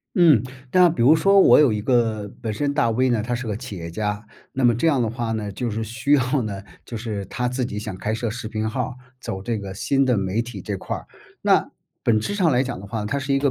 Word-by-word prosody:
嗯， 160 Hz, -, +6 dB, 0.3 s
那 180 Hz, -1 st, +6 dB
比 160 Hz, -7 st, -1 dB
如 145 Hz, +6 st, +7 dB
说 195 Hz, +5 st, +4 dB
我 -, -, +7 dB
有 135 Hz, -7 st, +5 dB
一 105 Hz, -, -1 dB
个 110 Hz, -4 st, +1 dB
本 110 Hz, -2 st, -2 dB
身 140 Hz, +6 st, -1 dB
大 120 Hz, -6 st, +2 dB
V 130 Hz, +3 st, +2 dB
呢， 110 Hz, -3 st, +1 dB
他 120 Hz, +1 st, -2 dB
是 120 Hz, 0 st, -4 dB
个 105 Hz, -, -2 dB
企 120 Hz, -5 st, -7 dB
业 85 Hz, -1 st, -6 dB
家， 105 Hz, +3 st, -3 dB, 0.3 s
那 130 Hz, -1 st, -1 dB
么 120 Hz, -1 st, +5 dB
这 145 Hz, +9 st, 0 dB
样 140 Hz, -5 st, +2 dB
的 115 Hz, -, 0 dB
话 115 Hz, -1 st, -3 dB
呢， 105 Hz, -2 st, -3 dB
就 120 Hz, +3 st, -3 dB
是 110 Hz, +1 st, -3 dB
需 115 Hz, +6 st, -2 dB
要 130 Hz, -1 st, +3 dB
呢 100 Hz, -3 st, -5 dB, 0.2 s
就 115 Hz, -, -7 dB
是 110 Hz, -3 st, -4 dB
他 125 Hz, +3 st, -3 dB
自 125 Hz, +1 st, -1 dB
己 105 Hz, -3 st, -4 dB
想 105 Hz, -, -5 dB
开 105 Hz, +3 st, -2 dB
设 115 Hz, 0 st, -2 dB
视 110 Hz, -1 st, -5 dB
频 110 Hz, 0 st, -2 dB
号 125 Hz, +4 st, -3 dB
儿， 125 Hz, -, -8 dB, 0.3 s
走 95 Hz, 0 st, -5 dB
这 115 Hz, -1 st, -2 dB
个 95 Hz, -2 st, -7 dB
新 135 Hz, +6 st, +1 dB
的 125 Hz, -3 st, +3 dB
媒 95 Hz, +3 st, 0 dB
体 115 Hz, -5 st, -8 dB
这 100 Hz, -2 st, -3 dB
块 -, -, -4 dB
儿。 -, -, -11 dB, 0.4 s
那 -, -, +3 dB, 0.3 s
本 110 Hz, -2 st, +3 dB
质 155 Hz, -, -3 dB
上 180 Hz, -6 st, +3 dB
来 125 Hz, 0 st, +3 dB
讲 125 Hz, -6 st, -5 dB
的 100 Hz, -, -9 dB
话， 110 Hz, 0 st, -4 dB
它 140 Hz, +7 st, -1 dB
是 135 Hz, 0 st, -1 dB
一 -, -, +3 dB
个 140 Hz, -1 st, +2 dB
115 Hz, 295 characters per minute, -23 LUFS, 105-130 Hz, 0.4 s, 如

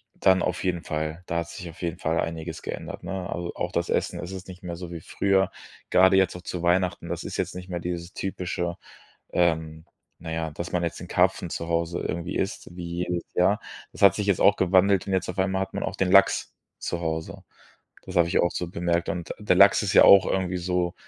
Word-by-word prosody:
dann 95 Hz, -1 st, +4 dB
auf -, -, -2 dB
jeden 90 Hz, -2 st, -1 dB
Fall! 80 Hz, +2 st, -3 dB
Da 85 Hz, -, -1 dB
hat 85 Hz, 0 st, -5 dB
sich 90 Hz, -1 st, -8 dB
auf 80 Hz, -, -13 dB
jeden 85 Hz, -, -3 dB
Fall 80 Hz, +1 st, 0 dB
einiges 80 Hz, -1 st, -5 dB
geändert, -, -, -6 dB
ne? 95 Hz, -2 st, -4 dB
Also 85 Hz, 0 st, -4 dB
auch -, -, -3 dB
das -, -, -1 dB
Essen -, -, -1 dB
es 90 Hz, +2 st, -6 dB
ist 95 Hz, -1 st, -8 dB
nicht 95 Hz, +1 st, -11 dB
mehr 85 Hz, -1 st, -5 dB
so 85 Hz, -1 st, -7 dB
wie 85 Hz, -, -6 dB
früher, 95 Hz, +3 st, +1 dB, 0.4 s
grade 95 Hz, +1 st, +6 dB
jetzt 95 Hz, -2 st, +3 dB
auch 90 Hz, -, -8 dB
zu 90 Hz, 0 st, -5 dB
Weihnachten. 90 Hz, 0 st, +1 dB
Das -, -, -4 dB
ist -, -, -5 dB
jetzt -, -, -2 dB
nicht 90 Hz, 0 st, -8 dB
mehr 90 Hz, -1 st, -3 dB
dieses 85 Hz, +1 st, -5 dB
typische, 90 Hz, -2 st, -3 dB, 0.5 s
ähm, 80 Hz, -2 st, 0 dB, 0.3 s
na 80 Hz, -1 st, -7 dB
ja, 80 Hz, -1 st, -2 dB
dass 85 Hz, +4 st, -6 dB
man 90 Hz, -, 0 dB
jetzt 85 Hz, -, -3 dB
den 90 Hz, -, -8 dB
Karpfen 90 Hz, -1 st, +2 dB
zu 85 Hz, -, -4 dB
Hause 85 Hz, 0 st, -1 dB
irgendwie 85 Hz, +1 st, -4 dB
isst, 85 Hz, -, -4 dB
wie 85 Hz, 0 st, -4 dB
jedes 90 Hz, -1 st, -2 dB
Jahr. 95 Hz, +4 st, +3 dB, 0.3 s
Das -, -, -12 dB
hat 100 Hz, -, +8 dB
sich 105 Hz, -, -2 dB
jetzt 100 Hz, -3 st, +2 dB
auch 100 Hz, -, +6 dB
gewandelt 95 Hz, +1 st, +3 dB
und 95 Hz, -, -1 dB
jetzt 95 Hz, -1 st, 0 dB
auf 90 Hz, -, -5 dB
einmal 95 Hz, 0 st, +1 dB
hat 95 Hz, -, -4 dB
man -, -, -2 dB
auch -, -, -3 dB
den 95 Hz, -1 st, +1 dB
Lachs 100 Hz, 0 st, +4 dB, 0.3 s
zu 85 Hz, -, -3 dB
Hause. 80 Hz, -1 st, -4 dB, 0.6 s
Das 95 Hz, -, -8 dB
habe 85 Hz, -1 st, +4 dB
ich -, -, +2 dB
auch 85 Hz, -, +2 dB
so 90 Hz, -, -3 dB
bemerkt. 85 Hz, -1 st, -1 dB
Und 85 Hz, 0 st, -4 dB
der 105 Hz, -4 st, +2 dB
Lachs 100 Hz, +2 st, +7 dB
ist 95 Hz, -, 0 dB
ja -, -, +8 dB
auch 100 Hz, -1 st, +8 dB
irgendwie 95 Hz, -1 st, -1 dB
so, 90 Hz, 0 st, -1 dB
90 Hz, 235 wpm, -26 LUFS, 85-95 Hz, 0.6 s, hat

